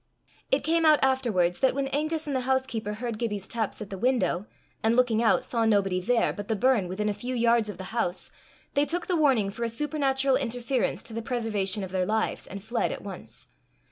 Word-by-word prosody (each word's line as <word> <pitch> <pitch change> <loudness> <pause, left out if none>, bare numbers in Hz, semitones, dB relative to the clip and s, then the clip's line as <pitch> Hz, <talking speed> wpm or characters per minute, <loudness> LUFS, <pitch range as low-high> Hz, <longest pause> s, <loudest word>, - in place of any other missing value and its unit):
It 270 - +2
came 330 +2 +2
out 310 -1 +6
afterwards 225 -10 +2
that 265 -1 +3
when 275 -1 0
Angus 310 +3 -1
and 285 -2 -2
the - - +2
housekeeper 245 -6 -1
heard 230 -1 -4
Gibbie's 210 -5 -3
taps 220 -2 -3
at 200 - -13
the 195 - -5
window, 235 -5 +1 0.3
and, 225 +1 +2
looking 240 -3 +3
out, 230 - +3
saw 230 -2 -1
nobody 195 -4 +2
there, 235 +5 +2
but 205 -1 -7
the 220 - 0
burn 220 -3 +2
within 200 +4 -2
a 210 - +1
few 245 +5 -5
yards 235 -2 +3
of 200 - -6
the 190 - -7
house, 195 -6 -2 0.4
they 285 - +3
took 345 +3 -2
the 360 - 0
warning 265 -11 +3
for 235 +4 -5
a 230 - 0
supernatural 270 0 +1
interference 245 0 -1
to 230 - -10
the 230 - -3
preservation 215 -5 -1
of 185 - -6
their 185 -1 0
lives, 220 +1 -1
and 195 0 -8
fled 235 +2 -1
at - - -6
once. 195 -3 -9
230 Hz, 215 wpm, -27 LUFS, 205-265 Hz, 0.4 s, out